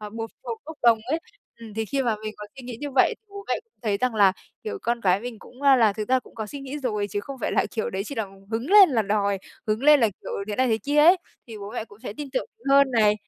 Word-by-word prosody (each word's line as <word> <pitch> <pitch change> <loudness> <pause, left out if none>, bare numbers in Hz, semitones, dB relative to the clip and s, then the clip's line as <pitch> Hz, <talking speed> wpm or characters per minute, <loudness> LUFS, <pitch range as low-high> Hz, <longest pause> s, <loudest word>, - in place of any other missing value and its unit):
bột 225 +2 -6
bột 455 - -5
bốc 320 0 -8
đồng 235 -2 +6
ấy. 315 - +2 0.4
Ừm, 225 -2 -11
thì 220 +1 -1
khi 275 +5 -1
mà 230 -4 0
mình 215 0 -4
có 210 - -8
suy 265 - -9
nghĩ 245 -2 -6
như 290 -1 -4
vậy 255 - +4
thì - - -56
bố 400 0 -9
mẹ - - +2
cũng 460 - -48
thấy 210 -3 +1
rằng 250 +2 0
là, 200 -3 +5 0.3
kiểu, 435 -1 -4
con 235 0 0
cái 190 -1 +3
mình 245 -2 -7
cũng 250 +6 -15
là 255 -7 +5
thực 215 0 -5
ra 260 0 +4
cũng - - -19
có 220 -2 -4
suy 280 +6 -8
nghĩ 275 +2 -6
rồi 210 -6 -1
chứ 205 - -2
không 270 +5 -8
phải - - -1
là, - - +2
kiểu, 220 - -2
đấy 190 +1 -2
chỉ 280 - -6
là 225 -4 -1 0.3
hứng 235 +9 -3
lên 405 -2 +9
là 230 -5 +2
đòi, 200 -1 0 0.3
hứng 215 +2 0
lên 295 0 +7
là, 225 - +4
kiểu, - - -7 0.2
thế 205 - -3
này 260 - +3
thế 220 -1 +2
kia 285 +4 -2
ấy, 335 +5 +8 0.3
thì 225 -3 -9
bố 200 0 -7
mẹ - - -3
cũng 205 -2 -17
sẽ 245 - -6
tin 295 -2 -5
tưởng 260 - -1 0.2
hơn 275 -1 +6
này. 215 -4 +4
235 Hz, 295 wpm, -25 LUFS, 215-275 Hz, 0.4 s, lên